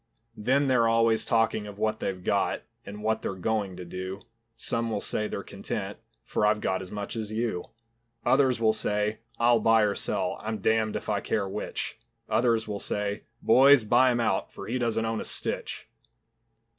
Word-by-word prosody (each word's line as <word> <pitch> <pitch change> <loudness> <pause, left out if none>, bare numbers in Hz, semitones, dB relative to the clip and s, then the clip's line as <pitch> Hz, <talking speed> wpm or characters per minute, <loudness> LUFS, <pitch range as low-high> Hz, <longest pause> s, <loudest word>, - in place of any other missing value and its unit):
Then 130 +6 +2
they're 125 -4 +3
always 115 0 +3
talking 115 -2 +1
of 100 -1 -9
what 110 0 0
they've 90 -2 -3
got, - - 0 0.2
And 105 +1 -8
what 110 0 +1
they're 95 - -3
going 100 -1 -1
to 90 - -7
do; 95 +3 -6 0.3
Some 115 0 -1
will 110 - -1
say 105 +1 -1
they're - - -5
content, - - -5 0.2
For - - -1
I've 105 0 +3
got 95 -2 -1
as 95 - -8
much 105 +2 -5
as 110 -2 -4
you. 110 -5 -2 0.6
Others 130 -3 +3
will 110 -1 +4
say, 105 0 -1 0.2
"I'll 120 0 +4
buy 115 0 +4
or 105 -1 +2
sell, - - -1
I'm 110 0 -3
damned 110 +1 +1
if - - -4
I 105 -2 +1
care 100 0 -1
which." 95 - -4 0.3
Others 115 0 +2
will 105 -1 -3
say, 105 +1 -2 0.2
"Boys, 135 +2 +7
buy 120 +4 +5
him 120 - 0
out, 115 - 0
For - - -8
he 125 +3 -2
doesn't 115 -2 0
own 110 0 -1
a - - -3
stitch." - - -3
110 Hz, 185 wpm, -27 LUFS, 105-115 Hz, 0.6 s, Boys